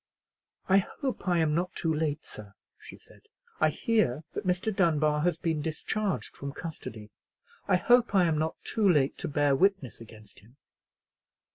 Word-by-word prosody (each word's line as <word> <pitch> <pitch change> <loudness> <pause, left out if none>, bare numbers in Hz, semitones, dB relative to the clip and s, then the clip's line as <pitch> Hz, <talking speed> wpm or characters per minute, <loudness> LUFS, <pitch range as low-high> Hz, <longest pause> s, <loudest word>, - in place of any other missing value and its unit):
"I 195 +1 +5
hope 260 +4 -5
I 175 -1 +3
am 160 -2 +2
not 180 +3 -1
too 165 -1 0
late, 155 -1 -2
sir," 100 -2 -11 0.2
she - - -12
said; - - -20 0.4
"I - - +4
hear 215 - 0
that 205 - -5
Mr. 185 +4 0
Dunbar 155 -5 +2
has 175 0 +1
been 160 -3 -1
discharged 190 +6 -3
from 140 0 -6
custody. 115 -11 -8 0.6
I 190 - +4
hope 240 +5 +3
I 185 -2 +5
am 160 -2 +1
not 160 +1 -1
too 215 -4 +1
late 140 -4 +2
to - - -3
bear 145 -1 +2
witness 185 - 0
against 110 -2 -14
him." 120 +6 -22
160 Hz, 165 wpm, -28 LUFS, 145-190 Hz, 0.6 s, I